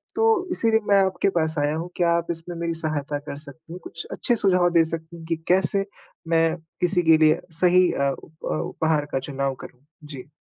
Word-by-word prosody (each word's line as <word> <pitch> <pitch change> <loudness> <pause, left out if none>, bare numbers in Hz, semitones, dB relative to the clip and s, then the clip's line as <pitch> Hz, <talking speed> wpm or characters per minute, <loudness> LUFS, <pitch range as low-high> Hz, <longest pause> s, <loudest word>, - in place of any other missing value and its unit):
तो 450 - +2 0.3
इसीलिए 225 -6 +3
मैं 200 - +6
आपके 190 +1 0
पास 160 -1 +1
आया 145 +1 0
हूँ 170 +2 -4
क्या 170 -1 +2
आप 170 - -3
इसमें 170 +1 -6
मेरी 170 0 -1
सहायता 145 -2 -2
कर 140 - -5
सकती 155 +3 -12
हैं? 180 - -8
कुछ 170 - -6
अच्छे 240 - 0
सुझाव 180 -4 +3
दे 165 -1 +5
सकती 165 +1 -6
हैं 165 - -11
कि 165 - +1
कैसे 190 +2 +2 0.4
मैं 165 0 +2 0.3
किसी 180 0 +2
के 160 -1 +6
लिए 155 - +4 0.2
सही 180 0 +5
अ, 140 0 +1
उप 160 0 -13
उपहार 150 - -1
का 135 - +1
चुनाव 135 0 -3
करूँ? 130 +3 -13 0.2
जी। 140 -2 -10
165 Hz, 200 wpm, -23 LUFS, 150-180 Hz, 0.4 s, मैं